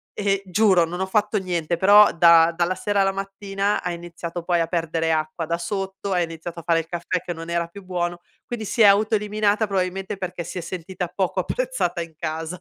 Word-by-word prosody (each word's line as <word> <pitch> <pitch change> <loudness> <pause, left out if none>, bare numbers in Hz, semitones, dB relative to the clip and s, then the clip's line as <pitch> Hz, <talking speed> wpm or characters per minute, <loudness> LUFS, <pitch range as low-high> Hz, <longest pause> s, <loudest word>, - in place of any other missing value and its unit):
e, 200 -1 0
giuro 190 -2 +4
non 170 +2 -4
ho 190 - 0
fatto 210 +2 +1
niente, 175 -2 -2
però 205 +3 +7
da 170 0 +6
dalla 175 +2 0
sera 205 +2 -1
alla 195 0 +2
mattina 195 +1 -2
ha 180 - -3
iniziato 170 0 -7
poi 175 0 +1
a 165 - +1
perdere 165 -1 -1
acqua 155 +1 -2
da 170 +1 -1
sotto, 195 +2 -4
ha 180 - +2
iniziato 170 0 -5
a - - -10
fare 165 0 +2
il 165 - -5
caffè 175 +1 -2
che 175 - -5
non 165 0 -8
era 170 0 -1
più 200 +3 -12
buono, 175 -1 -2 0.3
quindi 230 -3 -5
si 230 - -1
è - - +9
autoeliminata 210 +1 +3
probabilmente 190 0 -2
perché 180 -2 -5
si 170 - -7
è - - -2
sentita 180 +1 -5
poco 185 +1 -2
apprezzata 190 -5 -1
in 165 -1 -8
casa. 160 +3 -4
180 Hz, 210 wpm, -23 LUFS, 170-195 Hz, 0.3 s, è